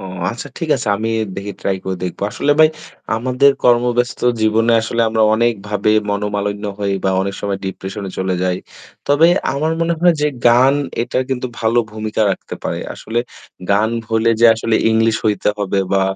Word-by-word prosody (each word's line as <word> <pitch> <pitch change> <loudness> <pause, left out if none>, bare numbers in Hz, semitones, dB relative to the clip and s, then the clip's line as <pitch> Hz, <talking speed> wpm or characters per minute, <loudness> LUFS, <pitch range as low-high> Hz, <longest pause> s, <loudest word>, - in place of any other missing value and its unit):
ও, - - -10 0.3
আচ্ছা 120 +5 -7
ঠিক 165 - -4
আছে 120 -4 -4
আমি 110 +2 -2 0.3
দেখি 100 +1 -5
ট্রাই 95 - 0
করে 95 -1 -3
দেখব। 90 - -4
আসলে 145 +7 +1
ভাই 155 - +8 0.5
আমাদের 130 +4 +3
কর্মব্যস্ত 120 0 +2 0.2
জীবনে 110 +2 +2
আসলে 115 +1 -2
আমরা 110 0 +1
অনেক 120 +1 +2
ভাবে 105 0 0 0.2
মনোমালিন্য 105 0 -2
হই 100 -1 -1
বা 95 - +2
অনেক 100 0 -3
সময় 100 -1 -2
ডিপ্রেশন 95 +2 -6
এ - - -7
চলে 95 0 -1
যাই। 90 -1 0 0.5
তবে 145 +3 +5 0.3
আমার 155 +3 -1
মনে 170 0 +1
হয় 175 0 +5
যে 150 - +2 0.2
গান 130 +4 +5 0.3
এটা 120 - -2
কিন্তু 130 -1 -2
ভালো 115 +1 +2
ভূমিকা 110 0 -2
রাখতে - - -5
পারে। - - -3 0.2
আসলে 115 +2 -4 0.5
গান 105 +2 +3 0.2
হলে 115 +1 +2
যে 120 - +8
আসলে 110 0 -1 0.2
ইংলিশ 110 0 +2
হইতে 105 -3 +1
হবে 100 -1 -1
বা 95 -1 +3
110 Hz, 180 wpm, -17 LUFS, 100-120 Hz, 0.5 s, ভাই